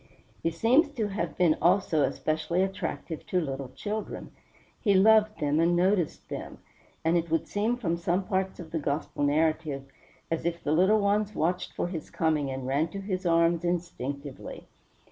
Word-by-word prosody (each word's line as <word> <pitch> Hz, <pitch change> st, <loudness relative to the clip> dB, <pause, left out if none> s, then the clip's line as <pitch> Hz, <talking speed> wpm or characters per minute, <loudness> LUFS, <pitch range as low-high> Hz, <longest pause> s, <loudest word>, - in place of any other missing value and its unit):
He 165 Hz, -, +1 dB
seems 235 Hz, -, +3 dB
to 220 Hz, -4 st, -1 dB
have 175 Hz, -4 st, -3 dB
been 170 Hz, -4 st, +4 dB
also 175 Hz, -3 st, +3 dB
especially 160 Hz, +5 st, 0 dB
attractive 190 Hz, -4 st, -4 dB
to 185 Hz, -, +1 dB
little 135 Hz, -5 st, -4 dB
children; 210 Hz, +9 st, -5 dB, 0.5 s
he 200 Hz, -3 st, +3 dB
loved 215 Hz, 0 st, +5 dB
them 150 Hz, 0 st, +1 dB
and 170 Hz, +1 st, +3 dB
noticed 180 Hz, -2 st, +1 dB
them; -, -, -6 dB, 0.5 s
and 165 Hz, +2 st, +4 dB
it 170 Hz, 0 st, -1 dB
would 165 Hz, 0 st, 0 dB
seem 220 Hz, +4 st, 0 dB
from 170 Hz, -8 st, -1 dB
some 175 Hz, +3 st, 0 dB
parts 190 Hz, -1 st, -2 dB
of 165 Hz, -3 st, -9 dB
the 165 Hz, -, -1 dB
Gospel 145 Hz, 0 st, -2 dB
narrative 150 Hz, -1 st, +1 dB, 0.5 s
as 165 Hz, -, -1 dB
if 170 Hz, 0 st, -2 dB
the 145 Hz, -, 0 dB
little 190 Hz, +7 st, +4 dB
ones 205 Hz, +1 st, +1 dB
watched 180 Hz, +3 st, -1 dB
for -, -, -2 dB
his 170 Hz, -4 st, -6 dB
coming 155 Hz, -4 st, 0 dB
and 130 Hz, -1 st, -4 dB
ran 140 Hz, +5 st, +1 dB
to 195 Hz, +4 st, -7 dB
his 190 Hz, -2 st, -3 dB
arms 170 Hz, 0 st, +3 dB
instinctively. 145 Hz, -6 st, -4 dB
170 Hz, 170 wpm, -28 LUFS, 155-195 Hz, 0.5 s, loved